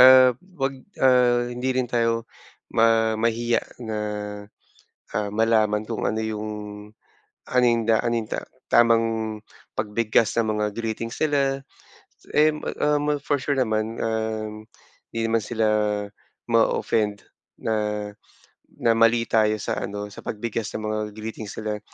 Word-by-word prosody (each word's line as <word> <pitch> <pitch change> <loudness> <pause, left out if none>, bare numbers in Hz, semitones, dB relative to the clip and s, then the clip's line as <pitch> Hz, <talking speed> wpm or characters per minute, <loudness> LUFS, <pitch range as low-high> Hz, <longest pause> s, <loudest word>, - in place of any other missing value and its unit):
ah, 130 0 +9 0.2
wag, 135 0 0 0.2
ah, 125 -2 +4
hindi 125 +1 -1
rin 130 - +2
tayo 115 -1 0 0.5
ma 115 0 +4
mahiya 115 +1 +1 0.2
na, 110 -1 -3 1.2
ah, 105 -1 -1
malaman 110 -1 +2
kung 115 - -3
ano 110 - 0
yung 110 -1 -3 1.0
ano 125 0 +3
yung 115 -2 +3
da 110 -1 +5
ano 120 - +1
yung 110 - -8
ta - - -2 0.3
tamang 115 -1 +5 0.7
pagbigkas 110 +1 +1
ng 110 -2 +2
mga 105 0 0
greetings 115 0 -3
nila. 135 -2 +1 0.7
Em 150 0 +4 0.2
um, 150 0 +2
for 145 +1 0
sure 140 +2 -1
naman, 110 -1 0
um, 110 -1 -2 0.5
hindi 115 - -2
naman 115 -1 +1
sila 115 -2 0 0.8
ma-ooffend 110 -2 +1 0.4
na 105 -1 -1 0.7
na 115 - +3
mali 115 +1 +5
tayo 110 -1 +4
sa - - -2
ano, 105 0 -5
sa - - -11
pagbigkas 110 0 -3
ng 110 - -4
mga 110 0 -1 0.2
greetings 110 -1 -6
nila. 105 -1 -3
115 Hz, 130 wpm, -24 LUFS, 110-120 Hz, 1.2 s, ah